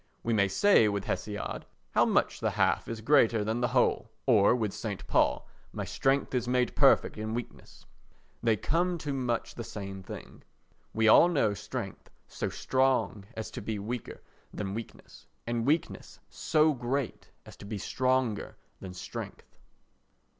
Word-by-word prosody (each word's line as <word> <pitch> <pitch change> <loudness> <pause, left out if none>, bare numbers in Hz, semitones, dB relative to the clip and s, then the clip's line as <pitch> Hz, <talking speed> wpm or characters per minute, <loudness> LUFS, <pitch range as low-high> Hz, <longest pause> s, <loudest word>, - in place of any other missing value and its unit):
We 115 - 0
may 100 -2 +3
say 110 - +4
with 100 -1 -2
Hesiod 105 -1 -4 0.3
"How - - +4
much - - +1
the - - 0
half - - +1
is 115 -1 -5
greater 115 -4 +4
than 110 +3 -1
the 120 - +2
whole!" 125 -2 +1 0.2
or 115 -3 +5
with 110 -5 -1
S. 105 -4 -2
Paul - - +1 0.2
"My - - -4
strength 135 +1 0
is 125 -2 0
made 125 0 +1
perfect - - +4
in 110 +1 -3
weakness"; 120 -1 -8 0.6
they 115 -2 +2
come 175 - 0
to 150 -3 -4
much 125 -3 -2
the 120 - -6
same 100 -3 -7
thing. - - -10 0.5
We 110 0 +2
all 110 - +8
know 135 -12 +2
strength 105 +1 -6 0.2
so - - -3
strong 130 -6 0
as 110 - -5
to - - -6
be 105 +1 -3
weaker 115 +4 -6 0.3
than 100 -2 -4
weakness 115 +1 -9 0.2
and 120 0 -1
weakness 155 +3 -1
so 155 0 +2
great 125 0 -3 0.2
as - - -12
to - - -11
be 105 +1 -4
stronger 130 0 -1 0.2
than 90 -1 -8
strength. 90 0 -8
115 Hz, 160 wpm, -29 LUFS, 105-130 Hz, 0.6 s, all